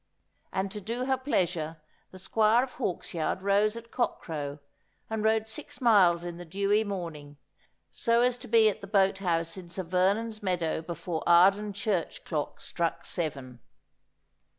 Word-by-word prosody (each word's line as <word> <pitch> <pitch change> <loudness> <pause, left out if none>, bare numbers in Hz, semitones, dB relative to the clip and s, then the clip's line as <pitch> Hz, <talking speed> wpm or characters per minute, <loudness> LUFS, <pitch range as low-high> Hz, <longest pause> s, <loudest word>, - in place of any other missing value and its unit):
And 190 0 -2
to 210 - -6
do 235 +5 -3
her 265 0 +2
pleasure 175 - -1 0.3
the 185 - -12
Squire 220 +5 +3
of 265 - -6
Hawksyard 180 -5 -2
rose 205 +3 +2
at 230 0 -11
cockcrow 150 - -2 0.5
and 220 -1 -1
rode 220 0 +2
six 300 +7 -7
miles 190 -9 +5
in 175 -1 -6
the 175 - -7
dewy 200 +5 +1
morning, 165 -8 -6 0.5
so 235 0 +2
as 250 0 +3
to - - -9
be 225 -1 +5
at 215 0 -1
the 195 - -8
boat 195 -1 +3
house 165 -2 -1
in 180 -2 -9
Sir 185 +2 -4
Vernon's 200 +6 0
meadow 175 -5 -1
before 165 0 -4
Arden 195 +4 +5
church 200 -3 -2
clock 150 -4 -3
struck 170 -1 -2
seven. 135 -7 -4
190 Hz, 155 wpm, -29 LUFS, 170-220 Hz, 0.5 s, miles